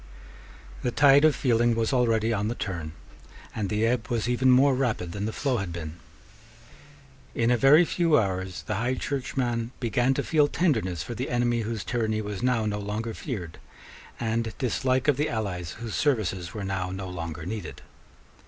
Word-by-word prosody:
The 125 Hz, -, 0 dB
tide 140 Hz, +2 st, +5 dB
of 155 Hz, -3 st, +5 dB
feeling 120 Hz, -2 st, +2 dB
was 115 Hz, +3 st, 0 dB
already 115 Hz, -2 st, +2 dB
on 105 Hz, -1 st, -1 dB
the 120 Hz, -, -2 dB
turn; 85 Hz, -8 st, -4 dB, 0.6 s
and 105 Hz, -3 st, -2 dB
the 105 Hz, +2 st, +1 dB
ebb 115 Hz, -2 st, 0 dB
was 120 Hz, -1 st, -1 dB
even 125 Hz, +1 st, +2 dB
more 135 Hz, +2 st, +6 dB
rapid 120 Hz, -10 st, -1 dB
than 100 Hz, +3 st, -4 dB
the 110 Hz, -, -2 dB
flow 135 Hz, +1 st, -1 dB
had 95 Hz, -5 st, -3 dB
been. 80 Hz, -1 st, -6 dB, 1.4 s
In 115 Hz, +1 st, +2 dB
a -, -, +5 dB
very 140 Hz, +7 st, +6 dB
few 165 Hz, -2 st, +2 dB
hours 95 Hz, -3 st, -2 dB
the 105 Hz, -, -3 dB
High 120 Hz, +4 st, 0 dB
Churchman 125 Hz, -3 st, -2 dB
began 125 Hz, +2 st, +1 dB
to -, -, -1 dB
feel 150 Hz, -3 st, +3 dB
tenderness 110 Hz, -, 0 dB
for 120 Hz, -, -6 dB
the 125 Hz, +4 st, -4 dB
enemy 120 Hz, -1 st, +1 dB
whose 110 Hz, -1 st, -3 dB
tyranny 110 Hz, -3 st, -1 dB
was 105 Hz, -2 st, -5 dB
now 125 Hz, -3 st, +1 dB
no 105 Hz, -1 st, -1 dB
longer 105 Hz, +3 st, -3 dB
feared, 95 Hz, -, -6 dB, 0.6 s
and 115 Hz, -1 st, -2 dB
dislike 130 Hz, +1 st, 0 dB
of 145 Hz, -3 st, +4 dB
the 150 Hz, +1 st, 0 dB
allies 90 Hz, -, -3 dB
whose 115 Hz, -2 st, -7 dB
services 95 Hz, -, 0 dB
were 105 Hz, -, -5 dB
now 95 Hz, -1 st, -2 dB
no 95 Hz, +1 st, -5 dB
longer 85 Hz, -3 st, -6 dB
needed. 105 Hz, -2 st, -6 dB
115 Hz, 180 wpm, -26 LUFS, 100-125 Hz, 1.4 s, more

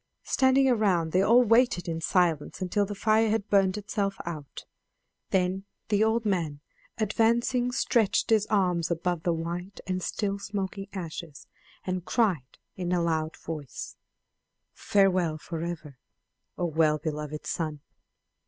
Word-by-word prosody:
Standing 265 Hz, 0 st, +3 dB
around 195 Hz, -9 st, +2 dB
they 185 Hz, -, +3 dB
all 235 Hz, +5 st, +6 dB
waited 230 Hz, -6 st, +3 dB
in 165 Hz, -1 st, -3 dB
silence 170 Hz, -5 st, +1 dB
until 195 Hz, +2 st, 0 dB
the 205 Hz, -, -5 dB
fire 220 Hz, +2 st, +3 dB
had 215 Hz, -1 st, 0 dB
burnt 195 Hz, -1 st, +3 dB
itself 200 Hz, -1 st, -2 dB
out; 155 Hz, -5 st, -7 dB, 0.6 s
then 190 Hz, 0 st, +1 dB, 0.3 s
the 210 Hz, 0 st, +3 dB
old 225 Hz, +1 st, +1 dB
man 165 Hz, -8 st, -1 dB, 0.4 s
advancing 235 Hz, +3 st, +2 dB
stretched 235 Hz, -5 st, +1 dB
his 215 Hz, -1 st, +4 dB
arms 180 Hz, -5 st, +1 dB
above 170 Hz, 0 st, -1 dB
the 170 Hz, -, +1 dB
white 170 Hz, +4 st, -4 dB
and 185 Hz, -1 st, -2 dB
still 200 Hz, +2 st, -2 dB
smoking 195 Hz, -1 st, -4 dB
ashes 165 Hz, -5 st, -7 dB, 0.4 s
and 185 Hz, -1 st, -2 dB
cried 180 Hz, -, 0 dB, 0.2 s
in 180 Hz, -1 st, -3 dB
a 180 Hz, -, +2 dB
loud 160 Hz, -1 st, -1 dB
voice: 150 Hz, -5 st, -7 dB, 0.8 s
"Farewell 185 Hz, -5 st, +2 dB
forever, 165 Hz, -4 st, -6 dB, 0.6 s
O 175 Hz, -, 0 dB
well 155 Hz, -2 st, +2 dB
beloved 150 Hz, 0 st, -5 dB
son! 155 Hz, -3 st, -3 dB
185 Hz, 135 wpm, -28 LUFS, 165-210 Hz, 0.8 s, all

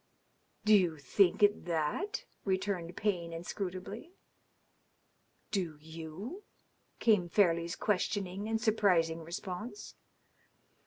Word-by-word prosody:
"Do 215 Hz, 0 st, +7 dB
you 175 Hz, -5 st, +3 dB
think 180 Hz, +8 st, +3 dB
it 205 Hz, 0 st, +4 dB
that?" 175 Hz, -, -1 dB, 0.2 s
returned 190 Hz, -3 st, -1 dB
Payne 180 Hz, -5 st, 0 dB
inscrutably. 190 Hz, -, -5 dB, 1.4 s
"Do 180 Hz, -7 st, -1 dB
yow?" 160 Hz, -, -7 dB, 0.6 s
came 205 Hz, -7 st, +3 dB
Fairleigh's 170 Hz, -3 st, +3 dB
questioning 200 Hz, -1 st, -1 dB
and 225 Hz, 0 st, +1 dB
surprising 190 Hz, -7 st, +3 dB
response. 180 Hz, -, -6 dB
185 Hz, 90 wpm, -32 LUFS, 170-210 Hz, 1.4 s, Do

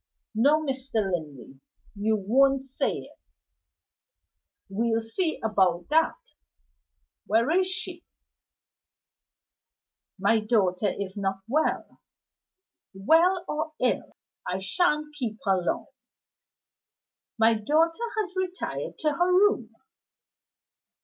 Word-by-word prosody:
"No, 285 Hz, +8 st, +3 dB
Mr. 265 Hz, -2 st, -4 dB
Linley, 155 Hz, -, -3 dB, 0.4 s
you 215 Hz, +2 st, +1 dB
won't 265 Hz, +7 st, +2 dB
say 265 Hz, -, -1 dB
it." -, -, -9 dB, 1.5 s
"We'll 225 Hz, +3 st, 0 dB
see 315 Hz, +10 st, -2 dB
about 185 Hz, -5 st, +1 dB
that! 320 Hz, +1 st, +3 dB, 1.1 s
Where 230 Hz, +6 st, +2 dB
is 370 Hz, +2 st, +3 dB
she?" 370 Hz, -2 st, -4 dB, 2.1 s
"My 205 Hz, +3 st, +3 dB
daughter 210 Hz, -3 st, +1 dB
is 200 Hz, 0 st, -5 dB
not 195 Hz, -1 st, -2 dB
well." 305 Hz, +7 st, -1 dB, 0.9 s
"Well 335 Hz, -, +3 dB
or 310 Hz, +1 st, -3 dB
ill, 250 Hz, -, -1 dB, 0.3 s
I 185 Hz, -, -1 dB
shan't 300 Hz, -, 0 dB
keep 240 Hz, -7 st, -4 dB
her 190 Hz, -2 st, +2 dB
long." 175 Hz, -, -2 dB, 1.5 s
"My 225 Hz, 0 st, +5 dB
daughter 325 Hz, -, +1 dB
has 385 Hz, -3 st, -7 dB
retired 370 Hz, -1 st, -4 dB
to 305 Hz, -2 st, +1 dB
her 350 Hz, +5 st, +1 dB
room." 405 Hz, +3 st, +3 dB
245 Hz, 95 wpm, -26 LUFS, 200-320 Hz, 2.1 s, My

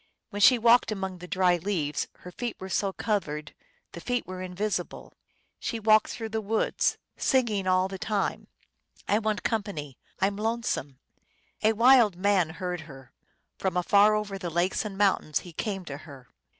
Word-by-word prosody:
When 205 Hz, 0 st, -4 dB
she 250 Hz, +4 st, +8 dB
walked 235 Hz, 0 st, +4 dB
among 190 Hz, -3 st, -4 dB
the 180 Hz, -, -9 dB
dry 180 Hz, -1 st, +2 dB
leaves 165 Hz, -5 st, -2 dB
Her 180 Hz, -, -9 dB
feet 240 Hz, +5 st, -4 dB
were 190 Hz, -, -7 dB
so 195 Hz, +1 st, 0 dB
covered 155 Hz, -8 st, -3 dB, 0.4 s
The 170 Hz, -, -9 dB
feet 245 Hz, +4 st, -1 dB
were 185 Hz, 0 st, -7 dB
invisible. 185 Hz, 0 st, -4 dB, 0.5 s
She 230 Hz, -, -3 dB
walked 215 Hz, 0 st, +4 dB
through 225 Hz, -1 st, -5 dB
the 220 Hz, 0 st, -2 dB
woods, 220 Hz, +2 st, 0 dB, 0.2 s
Singing 220 Hz, -7 st, +1 dB
all 185 Hz, 0 st, +3 dB
the 190 Hz, 0 st, -7 dB
time, 205 Hz, -1 st, -2 dB, 0.6 s
I 210 Hz, -, +3 dB
want 215 Hz, -1 st, -2 dB
company; 180 Hz, -, -3 dB, 0.2 s
I -, -, +3 dB
m 200 Hz, 0 st, -1 dB
lonesome! 220 Hz, -, -2 dB, 0.6 s
A 220 Hz, +1 st, +4 dB
wild 230 Hz, -3 st, +6 dB
man 185 Hz, -2 st, +2 dB
heard 180 Hz, -2 st, -3 dB
her: 135 Hz, -2 st, -13 dB, 0.5 s
From 185 Hz, -2 st, -1 dB
afar 205 Hz, +4 st, +5 dB
over 205 Hz, -2 st, -3 dB
the 180 Hz, -2 st, -4 dB
lakes 175 Hz, +3 st, 0 dB
and 200 Hz, -2 st, -6 dB
mountains 195 Hz, -7 st, +2 dB
He 175 Hz, -, -12 dB
came 195 Hz, +2 st, -3 dB
to 140 Hz, -3 st, -6 dB
her. 140 Hz, -5 st, -13 dB
195 Hz, 170 wpm, -27 LUFS, 180-215 Hz, 0.6 s, she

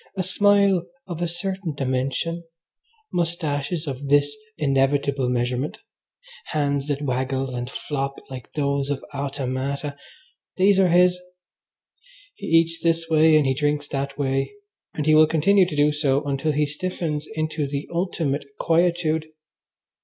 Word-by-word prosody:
A 185 Hz, -, +1 dB
smile 200 Hz, -1 st, +3 dB, 0.2 s
of 175 Hz, -2 st, -6 dB
a 175 Hz, -, +1 dB
certain 175 Hz, -1 st, -3 dB
dimension, 135 Hz, +6 st, -2 dB, 0.7 s
moustaches 165 Hz, -2 st, -1 dB
of 140 Hz, -1 st, -5 dB
this 145 Hz, 0 st, +3 dB, 0.2 s
inevitable 135 Hz, -1 st, +1 dB
measurement, 125 Hz, +3 st, -1 dB, 0.7 s
hands 145 Hz, -2 st, -1 dB
that 145 Hz, 0 st, -2 dB
waggle 130 Hz, 0 st, -1 dB
and 125 Hz, 0 st, -4 dB
flop 140 Hz, -1 st, -3 dB
like 130 Hz, -2 st, -9 dB
those 140 Hz, -1 st, 0 dB
of 145 Hz, -2 st, -3 dB
automata 140 Hz, +1 st, -3 dB, 0.6 s
these 195 Hz, +1 st, +4 dB
are 190 Hz, -, +5 dB
his. 180 Hz, +1 st, +4 dB, 1.1 s
He -, -, -8 dB
eats 165 Hz, 0 st, +3 dB
this 165 Hz, 0 st, +1 dB
way 155 Hz, 0 st, +5 dB
and 150 Hz, -, +3 dB
he 135 Hz, -, +2 dB
drinks 145 Hz, +1 st, 0 dB
that 140 Hz, 0 st, -3 dB
way, 135 Hz, +3 st, -1 dB, 0.4 s
and 150 Hz, -, -2 dB
he 155 Hz, -, +4 dB
will 155 Hz, 0 st, +7 dB
continue 180 Hz, +5 st, +4 dB
to 175 Hz, -, -5 dB
do 145 Hz, +1 st, +4 dB
so 145 Hz, -2 st, +1 dB
until 145 Hz, +2 st, -1 dB
he 150 Hz, +1 st, +2 dB
stiffens 155 Hz, 0 st, -3 dB
into 155 Hz, -1 st, -1 dB
the 140 Hz, +1 st, -4 dB
ultimate 165 Hz, -5 st, -1 dB
quietude. 165 Hz, -2 st, +1 dB
150 Hz, 140 wpm, -23 LUFS, 140-165 Hz, 1.1 s, will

